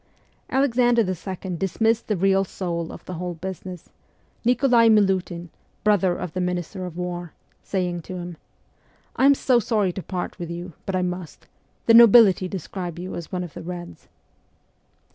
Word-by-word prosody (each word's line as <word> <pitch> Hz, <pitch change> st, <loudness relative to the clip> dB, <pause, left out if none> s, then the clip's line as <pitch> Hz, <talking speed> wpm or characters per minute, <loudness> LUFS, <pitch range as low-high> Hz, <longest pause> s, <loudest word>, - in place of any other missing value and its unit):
Alexander 245 Hz, -3 st, +3 dB
II. 185 Hz, -1 st, -4 dB
dismissed 220 Hz, +6 st, 0 dB
the 210 Hz, -, 0 dB
real 195 Hz, +1 st, +3 dB
soul 170 Hz, -3 st, -4 dB
ot -, -, -11 dB
the 185 Hz, -, -6 dB
whole 175 Hz, 0 st, -4 dB
business, 185 Hz, 0 st, -8 dB, 0.5 s
Nikolai 245 Hz, -1 st, +4 dB
Milutin 190 Hz, -5 st, +2 dB, 0.3 s
(brother 195 Hz, -4 st, +3 dB
of 170 Hz, -, -5 dB
the 185 Hz, -, -2 dB
minister 180 Hz, +1 st, -3 dB
of 175 Hz, -1 st, -9 dB
war), 175 Hz, -2 st, -5 dB, 0.3 s
saying 180 Hz, -3 st, -2 dB
to 185 Hz, -, -8 dB
him, 175 Hz, -2 st, -7 dB, 0.8 s
'I 265 Hz, -, +4 dB
am 280 Hz, -, +6 dB
so 255 Hz, -2 st, +3 dB
sorry 210 Hz, -5 st, +1 dB
to 190 Hz, -, -5 dB
part 180 Hz, +2 st, -5 dB
with 170 Hz, -1 st, -5 dB
you, 175 Hz, +1 st, -6 dB
but 195 Hz, -, -1 dB
I 185 Hz, -, +1 dB
must: 180 Hz, -2 st, -5 dB, 0.4 s
the 230 Hz, -, +5 dB
nobility 225 Hz, -5 st, +7 dB
describe 180 Hz, -1 st, -6 dB
you 180 Hz, +2 st, -6 dB
as 170 Hz, -, -7 dB
one 180 Hz, -1 st, -2 dB
of 170 Hz, -4 st, -9 dB
the -, -, -8 dB
Reds.' 175 Hz, 0 st, -8 dB
185 Hz, 160 wpm, -23 LUFS, 175-210 Hz, 0.8 s, nobility